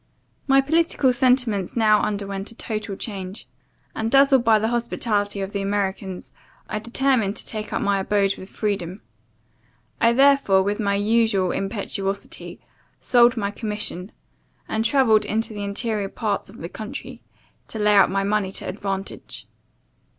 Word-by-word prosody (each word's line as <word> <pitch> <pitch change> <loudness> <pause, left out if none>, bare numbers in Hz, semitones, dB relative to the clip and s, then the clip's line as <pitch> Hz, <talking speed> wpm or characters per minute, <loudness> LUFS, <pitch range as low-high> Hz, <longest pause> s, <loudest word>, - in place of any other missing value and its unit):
My 270 0 +5
political 295 -3 +2
sentiments 245 -7 +1
now 215 -2 +4
underwent 200 -1 -3
a 230 - -13
total 215 -4 -4
change; 195 -1 -6 0.5
and, 220 0 -1
dazzled 270 -1 +5
by 225 -2 +5
the 220 +1 0
hospitality 215 -4 -1
of 195 0 -4
the 200 - -2
Americans, 195 -1 -3 0.4
I 215 - -3
determined 235 -2 +1
to - - -6
take 215 -1 -4
up - - -1
my 200 -1 +2
abode 200 0 +1
with 190 - -11
freedom. 200 -3 -3 1.0
I, 230 - +5
therefore, 270 -7 +4
with 205 +2 -1
my 200 -2 +1
usual 205 -3 +2
impetuosity, 195 -1 -4 0.4
sold 240 0 +4
my 200 -2 -1
commission, 210 -3 -4 0.6
and 220 0 -1
travelled 230 -3 +4
into 220 +1 -2
the 205 -1 -5
interior 200 0 -2
parts - - -2
of - - -13
the - - -6
country, - - -7 0.5
to - - -7
lay 210 -1 +3
out 200 -1 +6
my 195 +1 0
money 200 -1 0
to - - -4
advantage. 195 0 -5
210 Hz, 150 wpm, -23 LUFS, 195-230 Hz, 1.0 s, out